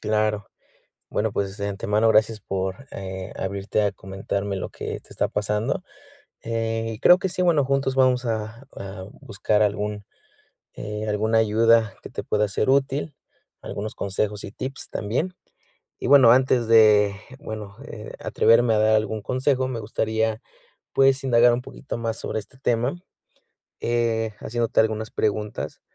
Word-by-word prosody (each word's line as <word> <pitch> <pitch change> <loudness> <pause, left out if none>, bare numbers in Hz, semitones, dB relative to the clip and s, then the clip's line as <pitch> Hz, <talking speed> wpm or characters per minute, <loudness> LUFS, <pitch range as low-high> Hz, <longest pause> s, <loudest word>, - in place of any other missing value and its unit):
Claro. 105 -1 0 0.6
Bueno, 110 0 -1
pues, 100 -1 -2
de 100 - -3
antemano, 105 +3 +1
gracias 110 0 +3
por, 95 +6 -4
eh, 95 -1 -6
abrirte 100 +2 -1
a 100 -1 +1
comentarme 100 +1 -4
lo 95 - -5
que - - -6
te - - -22
está - - -1
pasando. 105 - -1 0.6
Eh, 115 0 -2
y - - -14
creo 180 +1 +7
que 190 - -1
sí, 180 - -3
bueno, 165 -6 +3
juntos 135 0 0
vamos 130 -1 +3
a 115 +2 -4
a 95 -1 -7 0.2
buscar 105 +2 0
algún, 105 0 -1 0.7
eh, 105 +1 -5
alguna 110 +2 +1
ayuda 110 -1 +3
que - - -8
te - - -5
pueda 105 0 +1
ser 105 +5 0
útil, 140 +2 +1 0.5
algunos 105 +2 -5
consejos 100 +1 -2
y 100 - -7
tips 130 +4 -6
también. 130 - -2 0.7
Y - - -3
bueno 135 -4 +8
antes 125 -2 +3
de 105 -3 +6 0.2
bueno, 105 -2 -7
eh, 105 -6 -9
atreverme 115 0 +3
a 110 - +2
dar 110 0 +4
algún 110 0 -1
consejo 130 +3 0
me 125 -3 -4
gustaría, 110 +1 -1 0.5
pues, 135 0 +4
indagar 120 -2 +5
un 120 - -1
poquito 130 0 -7
más 115 -1 -3
sobre - - -3
este 110 +5 -14
tema, 120 +3 0 0.9
eh, 115 -2 0
haciéndote 115 0 0
algunas 110 0 -1
preguntas. 105 0 -2
110 Hz, 155 wpm, -24 LUFS, 105-120 Hz, 0.9 s, bueno